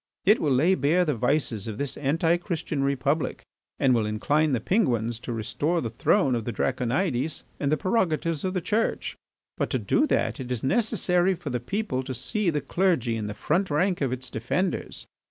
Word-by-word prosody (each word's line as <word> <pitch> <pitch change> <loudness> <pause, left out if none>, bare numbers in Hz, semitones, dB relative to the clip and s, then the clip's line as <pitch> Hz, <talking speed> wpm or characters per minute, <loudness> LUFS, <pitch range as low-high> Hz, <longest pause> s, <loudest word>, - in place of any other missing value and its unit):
It 210 +4 +5
will 150 - +1
lay 150 +9 +4
bare 165 +4 +2
the 150 - +1
vices 125 -4 0
of 110 -2 -5
this 140 +1 -3
Anti 165 +4 +1
Christian 165 -5 -3
Republic 140 +2 0 0.3
and 130 -2 +3
will 110 -3 +1
incline 145 +9 +1
the 125 - +1
Penguins 120 - +1
to 120 - -6
restore 145 +9 -1
the 115 -7 -3
throne 125 +3 +2
of 115 -2 -1
the 120 - -3
Draconides 130 - -1 0.2
and 140 -1 0
the 155 - +3
prerogatives 165 -6 0
of 185 0 -2
the 180 - 0
Church. 220 +6 -1 0.4
But - - -1
to - - 0
do 300 +1 +2
that - - 0
it 125 -1 -6
is 120 -3 -2
necessary 185 - +2
for 165 -5 -6
the 125 - -1
people 130 - -2
to 130 0 -5
see 195 - -1
the 150 -3 0
clergy 145 -6 +1
in 110 -2 -3
the 105 - -5
front 180 - 0
rank 175 +4 +1
of 135 -3 +1
its 125 -1 -4
defenders. 150 +12 -2
145 Hz, 195 wpm, -26 LUFS, 125-180 Hz, 0.4 s, It